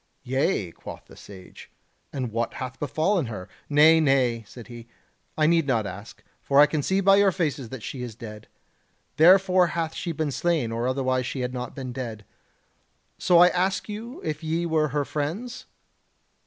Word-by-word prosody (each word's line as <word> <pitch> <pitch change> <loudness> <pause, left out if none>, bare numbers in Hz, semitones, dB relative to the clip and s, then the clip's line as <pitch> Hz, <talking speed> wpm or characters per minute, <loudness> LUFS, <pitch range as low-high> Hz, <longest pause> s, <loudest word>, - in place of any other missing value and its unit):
"Yea," 130 - 0
quoth - - -11
the - - -16
Sage, 95 -2 -13 0.4
"and 130 -4 -4
what 115 +1 -2
hath 130 0 -6
befallen 155 - 0
her?... 105 -5 -7 0.2
Nay, 155 +2 +6
nay," 130 -6 +2
said 120 +2 -11
he, 120 -1 -11 0.5
"I 155 - +3
need 165 -2 +3
not 115 -5 +1
ask; 100 +3 -9 0.2
for 140 0 +2
I 145 - +9
can 150 0 -2
see 190 +7 0
by 195 +1 +5
your 200 -1 +4
faces 150 -9 -2
that 130 -3 -8
she 130 - -6
is 120 -3 -6
dead. 105 -2 -10 0.7
Therefore 185 +2 +6
hath 165 -1 -3
she 175 - -4
been 155 -2 -2
slain, 145 -2 0
or 115 +2 -2
otherwise 130 -1 0
she 130 - -4
had 125 0 -3
not 125 -1 -6
been 130 -2 -6
dead. 115 -5 -6 0.9
So 175 - +4
I 175 +1 +8
ask 185 +2 -1
you 220 +4 -7
if 155 0 -4
ye 165 +2 -1
were 160 -2 +1
her 145 0 -2
friends?" 175 - -4
145 Hz, 180 wpm, -25 LUFS, 125-170 Hz, 0.9 s, I